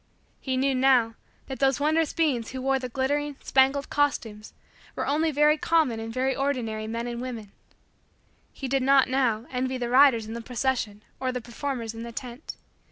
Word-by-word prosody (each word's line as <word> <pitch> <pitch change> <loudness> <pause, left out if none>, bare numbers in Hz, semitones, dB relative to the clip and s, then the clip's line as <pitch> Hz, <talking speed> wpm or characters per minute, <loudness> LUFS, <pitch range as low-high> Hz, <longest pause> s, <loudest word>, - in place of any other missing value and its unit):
He 260 -1 -2
knew, 270 +1 +2
now, 255 -3 +3 0.3
that 265 - -7
those 270 0 +2
wondrous 310 +1 +1
beings 275 -9 0
who 260 0 -6
wore 270 0 +2
the 255 -1 -5
glittering, 285 +3 -1
spangled, 270 +1 +2
costumes, 225 -7 -1 0.4
were - - -2
only 310 +3 +1
very 300 +1 +3
common 310 -10 +2
and 225 0 -5
very 260 +2 0
ordinary 235 -6 -2
men 230 +1 -3
and 240 0 -4
women. 230 -5 -6 1.0
He 270 - -6
did 270 +1 +1
not, 270 0 +5
now, 245 -4 +1
envy 260 0 -2
the 240 -1 -3
riders 255 -3 +5
in 220 - -7
the 235 - -5
procession 230 -3 -2 0.2
or 260 -1 -1
the 250 - -3
performers 235 -1 -5
in 225 - -8
the 235 0 -6
tent. 245 +4 -7
260 Hz, 180 wpm, -26 LUFS, 235-275 Hz, 1.0 s, not